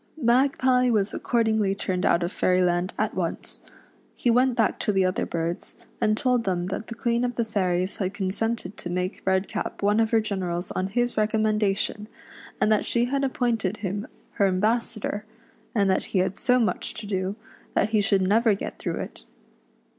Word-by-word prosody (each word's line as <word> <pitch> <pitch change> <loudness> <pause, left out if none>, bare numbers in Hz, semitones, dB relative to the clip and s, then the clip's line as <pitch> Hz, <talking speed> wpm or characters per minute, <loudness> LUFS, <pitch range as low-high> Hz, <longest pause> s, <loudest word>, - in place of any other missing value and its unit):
Magpie 255 -1 +3
was 210 -3 +1
accordingly 220 -4 +1
turned 185 -2 -1
out 170 - +3
of 170 - -2
Fairyland 180 -1 +2
at - - 0
once. - - -3 0.5
He 240 - +1
went 250 +1 +3
back 225 -3 +1
to - - +1
the 190 -2 +2
other 185 - 0
birds, 170 +1 -3 0.3
and 215 0 +2
told 250 -3 +2
them 180 -3 -1
that 220 - -5
the 230 - -6
Queen 235 +1 0
of 245 -1 -1
the 235 - 0
Fairies 185 -3 0
had 190 -2 -1
consented 205 +1 -2
to 175 - -6
make 180 +2 -2
Redcap 190 +1 -1
one 205 +2 +3
of 225 -1 +3
her 225 - +4
generals 185 -4 -3
on 185 - -1
his 240 +4 -1
recommendation, 215 -1 +1 0.5
and 215 - +3
that 215 - +3
she 235 0 +1
had 275 +2 -1
appointed 230 -6 0
him 205 +5 -3 0.3
her 200 - +5
ambassador, 215 +2 0 0.5
and 200 -3 +3
that - - 0
he - - -2
had 185 +2 0
so 250 0 +3
much 230 -3 -1
to 220 - -7
do, 190 -1 -2 0.4
that - - +2
he 215 -1 +3
should 195 -2 +2
never 215 +3 +3
get - - -6
through - - -2
it. - - -8
210 Hz, 180 wpm, -25 LUFS, 190-230 Hz, 0.5 s, her